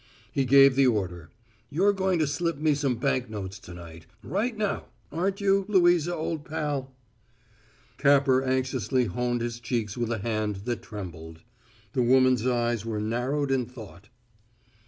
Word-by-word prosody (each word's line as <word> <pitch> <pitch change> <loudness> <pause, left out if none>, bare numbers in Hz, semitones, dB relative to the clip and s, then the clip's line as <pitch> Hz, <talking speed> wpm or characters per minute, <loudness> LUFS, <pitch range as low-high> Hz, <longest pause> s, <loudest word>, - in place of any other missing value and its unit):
He 135 -2 0
gave 135 +1 +7
the 135 -1 +5
order. 90 -7 -1 0.4
"You're 195 +7 +3
going 190 -2 +1
to 155 - +2
slip 165 +3 -1
me 155 0 +2
some 140 -3 0
bank 130 -1 0
notes 100 -2 -6
to - - -12
night 85 -2 -11 0.2
right 220 +4 -2
now, 210 -2 -1 0.3
aren't 190 +5 -1
you, 195 0 +3
Louisa, 175 -4 +3
old 160 -1 -3
pal?" 145 -4 -3 1.1
Capper 140 -2 +4
anxiously 130 -2 0
honed 120 +4 -1
his 120 0 -3
cheeks 115 -3 -2
with 120 -2 -2
a 115 - 0
hand 105 -2 -2
that 120 -1 -2
trembled. 85 -6 -9 0.5
The 130 - +1
woman's 130 -1 +4
eyes 120 -3 0
were 110 -2 -3
narrowed 125 +6 -1
in 130 -3 +1
thought. 105 -9 -12
130 Hz, 155 wpm, -27 LUFS, 110-150 Hz, 1.1 s, gave